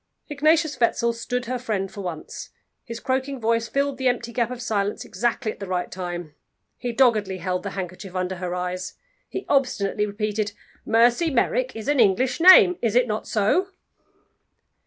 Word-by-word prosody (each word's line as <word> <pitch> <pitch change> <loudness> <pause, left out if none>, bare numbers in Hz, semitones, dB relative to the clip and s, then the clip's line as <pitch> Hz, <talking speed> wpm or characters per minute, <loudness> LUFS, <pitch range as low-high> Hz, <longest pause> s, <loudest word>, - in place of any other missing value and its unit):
Ignatius 310 +1 +2
Wetzel 235 0 +2
stood 245 +2 -3
her 250 +1 -3
friend 205 -6 -2
for 205 - -7
once. 175 -5 -7 0.4
His 230 -1 -6
croaking 265 +1 -2
voice 230 0 0
filled 280 +1 -1
the 260 - +1
empty 245 -1 -1
gap 235 0 0
of 250 -1 -6
silence 210 -4 -2
exactly 235 -1 -1
at - - -13
the 200 - -6
right 180 -1 -2
time. 175 -4 -5 0.5
He 245 - -3
doggedly 220 -6 +2
held 180 -1 -2
the 200 - -4
handkerchief 185 0 -6
under 185 0 -2
her 180 0 -4
eyes. 180 0 -4 0.3
He 385 - -5
obstinately 210 -7 +1
repeated: 210 0 -2 0.3
"Mercy 240 +8 +4
Merrick 255 -1 0
is 220 +2 -7
an 290 -2 +2
English 235 - +3
name. 370 +1 +8
Is 230 -2 0
it 250 0 +5
not 215 -1 -3
so?" 220 - +1
230 Hz, 170 wpm, -24 LUFS, 195-255 Hz, 0.5 s, name